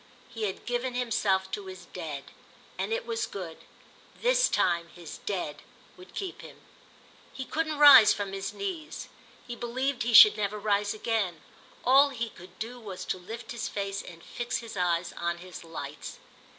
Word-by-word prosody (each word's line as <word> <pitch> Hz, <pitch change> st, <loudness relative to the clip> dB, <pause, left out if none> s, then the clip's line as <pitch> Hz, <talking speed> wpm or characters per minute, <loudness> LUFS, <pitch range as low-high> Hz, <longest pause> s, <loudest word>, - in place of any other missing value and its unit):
He 225 Hz, -2 st, -3 dB
had 190 Hz, -, -5 dB
given 245 Hz, +1 st, -2 dB
himself 200 Hz, -6 st, +1 dB
to 195 Hz, 0 st, -5 dB
his 185 Hz, -2 st, -9 dB
Dead, 155 Hz, -6 st, -5 dB, 0.5 s
and -, -, -3 dB
it 470 Hz, +2 st, -1 dB
was 455 Hz, -1 st, -2 dB
good: 180 Hz, -5 st, -7 dB, 0.6 s
this -, -, +3 dB
time 170 Hz, -1 st, +1 dB
his 170 Hz, -2 st, -10 dB
Dead 180 Hz, -7 st, -3 dB, 0.3 s
would 180 Hz, 0 st, -15 dB
keep 380 Hz, -3 st, -5 dB
him. -, -, -12 dB, 0.7 s
He 265 Hz, -, -6 dB
couldn't 310 Hz, 0 st, -2 dB
rise 285 Hz, -7 st, +10 dB
from 200 Hz, -2 st, -2 dB
his 195 Hz, 0 st, -3 dB
knees; 370 Hz, -6 st, -5 dB, 0.4 s
he 240 Hz, -, -6 dB
believed 255 Hz, +3 st, -2 dB
he 235 Hz, +1 st, 0 dB
should 215 Hz, -1 st, +10 dB
never 210 Hz, 0 st, -1 dB
rise 205 Hz, 0 st, 0 dB
again; 210 Hz, -7 st, -1 dB, 0.4 s
all 275 Hz, +3 st, +7 dB
he 235 Hz, -4 st, -3 dB
could 180 Hz, 0 st, -15 dB
do 240 Hz, +3 st, -6 dB
was 200 Hz, -5 st, -7 dB
to 185 Hz, -, -2 dB
lift 225 Hz, +6 st, -8 dB
his 235 Hz, -, -3 dB
face 200 Hz, -1 st, -3 dB
and 165 Hz, -2 st, -12 dB
fix 240 Hz, 0 st, -3 dB
his 230 Hz, -2 st, -8 dB
eyes 175 Hz, -1 st, 0 dB
on 170 Hz, 0 st, -2 dB
his 180 Hz, 0 st, -10 dB
lights. 165 Hz, -1 st, -7 dB
210 Hz, 170 wpm, -28 LUFS, 185-245 Hz, 0.7 s, rise